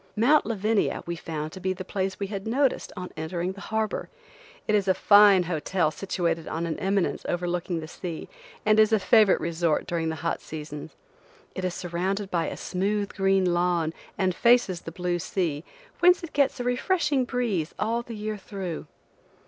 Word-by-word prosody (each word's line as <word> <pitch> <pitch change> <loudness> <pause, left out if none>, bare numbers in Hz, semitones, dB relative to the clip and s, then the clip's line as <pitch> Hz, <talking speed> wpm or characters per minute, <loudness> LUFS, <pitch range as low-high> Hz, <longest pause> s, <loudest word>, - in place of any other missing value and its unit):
Mount 260 +8 +4
Lavania 215 -1 0
we 170 - -3
found 155 -1 -5
to 190 - -9
be 185 0 -1
the 185 0 -7
place 190 -1 -2
we 200 - -1
had 195 +1 -5
noticed 265 +4 +1
on 180 0 -6
entering 170 +3 -3
the 195 +1 -10
harbor. 220 +1 -2 0.6
It 215 - +1
is 200 -2 +2
a 190 - +4
fine 205 -2 +7
hotel 165 0 0
situated 170 -3 -2
on 165 +1 -2
an 165 - -3
eminence 195 -1 0
overlooking 175 -1 -1
the 155 - -7
sea, 170 0 -6 0.4
and 215 0 +5
is 215 0 +5
a 220 - +5
favorite 210 0 +5
resort 165 -1 0
during 165 -2 -1
the 160 - -2
hot 165 - -1
seasons. 150 -1 -8 0.6
It 185 - -5
is 180 -1 -1
surrounded 190 +3 -2
by 170 -2 0
a - - -5
smooth 200 +2 -1
green 195 -2 +2
lawn 175 -2 +1 0.2
and 185 -2 +1
faces 235 -5 +3
the 165 - -7
blue 175 0 -2
sea, 165 -4 -2 0.4
whence 355 0 +5
it 335 - -7
gets 280 -2 +2
a - - -1
refreshing 275 +2 +1
breeze 235 - -1
all 230 +2 0
the 235 -1 -8
year 215 0 -4
through. 190 -6 -6
190 Hz, 180 wpm, -26 LUFS, 170-215 Hz, 0.6 s, fine